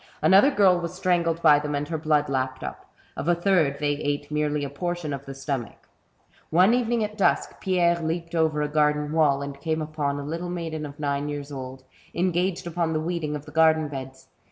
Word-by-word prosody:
Another 195 Hz, +8 st, +6 dB
girl 195 Hz, -9 st, +4 dB
was 170 Hz, +1 st, -5 dB
strangled 170 Hz, -3 st, 0 dB
by 150 Hz, -2 st, +7 dB
them, 150 Hz, 0 st, -3 dB
and 145 Hz, +1 st, -2 dB
her 165 Hz, -, -1 dB
blood 150 Hz, -1 st, +2 dB
lapped 130 Hz, -1 st, -2 dB
up. -, -, -7 dB, 0.3 s
Of -, -, -5 dB
a 175 Hz, -, +4 dB
third 170 Hz, -6 st, +2 dB
they 145 Hz, 0 st, 0 dB
ate 145 Hz, 0 st, -3 dB
merely 150 Hz, -1 st, 0 dB
a 140 Hz, -, -3 dB
portion 175 Hz, 0 st, -3 dB
of 140 Hz, 0 st, -7 dB
the 135 Hz, -, -7 dB
stomach. 135 Hz, -3 st, -5 dB, 0.6 s
One 185 Hz, +7 st, +5 dB
evening 240 Hz, -2 st, +1 dB
at 210 Hz, 0 st, -5 dB
dusk, 195 Hz, -, +1 dB
Pierre 175 Hz, -2 st, +2 dB
leaped 165 Hz, +1 st, -3 dB
over 160 Hz, -2 st, +1 dB
a -, -, 0 dB
garden 150 Hz, 0 st, +1 dB
wall, 145 Hz, -3 st, +2 dB
and 140 Hz, 0 st, -7 dB
came 160 Hz, +1 st, -1 dB
upon 150 Hz, -2 st, -2 dB
a -, -, -5 dB
little 165 Hz, +4 st, -4 dB
maiden 165 Hz, -3 st, -4 dB
of 145 Hz, +1 st, -12 dB
nine 145 Hz, 0 st, -1 dB
years 145 Hz, 0 st, -5 dB
old, 130 Hz, -1 st, -7 dB, 0.3 s
engaged 180 Hz, +1 st, 0 dB
upon 170 Hz, -1 st, -1 dB
the 155 Hz, -, 0 dB
weeding 160 Hz, -2 st, -2 dB
of 150 Hz, 0 st, -7 dB
the 150 Hz, -, -11 dB
garden 160 Hz, -1 st, +3 dB
beds. 130 Hz, -1 st, -8 dB
155 Hz, 205 wpm, -25 LUFS, 145-170 Hz, 0.6 s, by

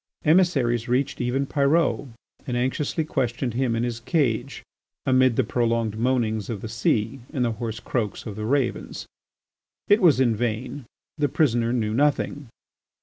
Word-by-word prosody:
Emissaries 145 Hz, -9 st, +3 dB
reached 130 Hz, +2 st, 0 dB
even 125 Hz, +3 st, 0 dB
Pyrot 145 Hz, +1 st, +1 dB, 0.4 s
and 125 Hz, -1 st, -1 dB
anxiously 135 Hz, +5 st, -1 dB
questioned 125 Hz, -4 st, -1 dB
him 120 Hz, -1 st, 0 dB
in 115 Hz, -, 0 dB
his 120 Hz, -1 st, -2 dB
cage 125 Hz, -4 st, -1 dB, 0.4 s
amid 130 Hz, -2 st, +4 dB
the 130 Hz, -, +3 dB
prolonged 115 Hz, -1 st, 0 dB
moanings 110 Hz, -3 st, 0 dB
of 110 Hz, -4 st, -4 dB
the -, -, -5 dB
sea 115 Hz, +2 st, 0 dB
and 130 Hz, -5 st, 0 dB
the 115 Hz, -, 0 dB
hoarse 115 Hz, -1 st, -5 dB
croaks 110 Hz, -5 st, -3 dB
of 105 Hz, -, -6 dB
the 105 Hz, 0 st, -4 dB
ravens. 135 Hz, +1 st, -1 dB, 0.8 s
It 205 Hz, +2 st, +5 dB
was 155 Hz, -8 st, +5 dB
in 120 Hz, -4 st, +3 dB
vain; 120 Hz, +4 st, -3 dB, 0.3 s
the 145 Hz, -1 st, +2 dB
prisoner 120 Hz, -6 st, +1 dB
knew 110 Hz, -3 st, 0 dB
nothing. 145 Hz, 0 st, 0 dB
125 Hz, 150 wpm, -24 LUFS, 115-140 Hz, 0.8 s, It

